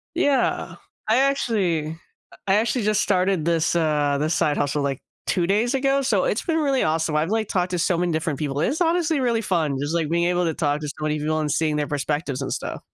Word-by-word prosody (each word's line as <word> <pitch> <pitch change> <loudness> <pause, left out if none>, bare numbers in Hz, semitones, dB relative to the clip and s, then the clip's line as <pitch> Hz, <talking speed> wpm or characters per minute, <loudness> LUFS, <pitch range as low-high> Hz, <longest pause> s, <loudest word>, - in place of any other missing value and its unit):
Yeah. 280 -2 +1 0.3
I 225 - +4
actually 220 - +1 0.4
uh, - - -15
I 195 - +4
actually 230 +2 +1
just 215 0 +2
started 185 -3 +1
this 165 -1 +1
this, - - -2
uh, 150 -3 +1
this 155 +3 0
side 150 -2 +1
hustle, 145 0 0
like, 140 -1 -2 0.3
2 175 -3 +1
days 220 +7 +1
ago, 275 +1 +2
so, 210 -8 +2
it's 210 - 0
been 325 -2 0
really 275 -4 +1
awesome. 160 0 0
I've, 155 +4 +1
like, 220 -1 0
talked 180 -2 -1
to 180 - -1
so 170 +1 +1
many 175 0 0
different 160 -3 -1
people; 145 -2 -2
it's 300 - 0
honestly 330 -2 +2
really 235 -3 +1
fun. 165 -9 0
Just, 145 +3 -2
like, 160 -3 0
being 170 +1 +1
able 175 0 +1
to 165 - 0
talk 150 -1 -1
to 150 - -4
so - - -5
many 155 0 -1
people 155 +1 -1
and 150 -2 -1
seeing 155 -2 +1
their 150 -1 -1
perspectives 145 -1 -2
and 135 - -2
stuff. - - -5
170 Hz, 235 wpm, -23 LUFS, 150-220 Hz, 0.4 s, I